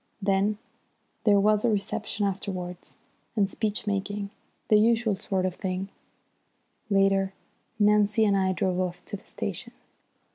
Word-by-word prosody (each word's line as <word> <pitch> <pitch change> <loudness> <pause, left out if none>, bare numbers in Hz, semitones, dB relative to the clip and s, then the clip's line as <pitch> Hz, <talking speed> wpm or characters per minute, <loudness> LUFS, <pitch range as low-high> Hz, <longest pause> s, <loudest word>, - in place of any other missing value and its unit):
Then 200 +1 +1 0.7
there 205 -2 +6
was 210 +1 +3
the 240 - +2
reception 210 0 -1
afterwards, 185 -2 -4 0.4
and 205 -3 +3
speech 210 +1 -2
making 200 0 -2 0.4
the 215 - +6
usual 225 -1 +3
sort 190 -1 -1
of 185 - -1
thing. 190 +1 -3 1.0
Later 195 -1 +3 0.4
Nancy 210 +1 +4
and 200 -1 +3
I 190 -1 +2
drove 185 0 0
off 180 -1 -3
to - - -5
the - - -21
station. - - -5
200 Hz, 135 wpm, -27 LUFS, 190-210 Hz, 1.0 s, there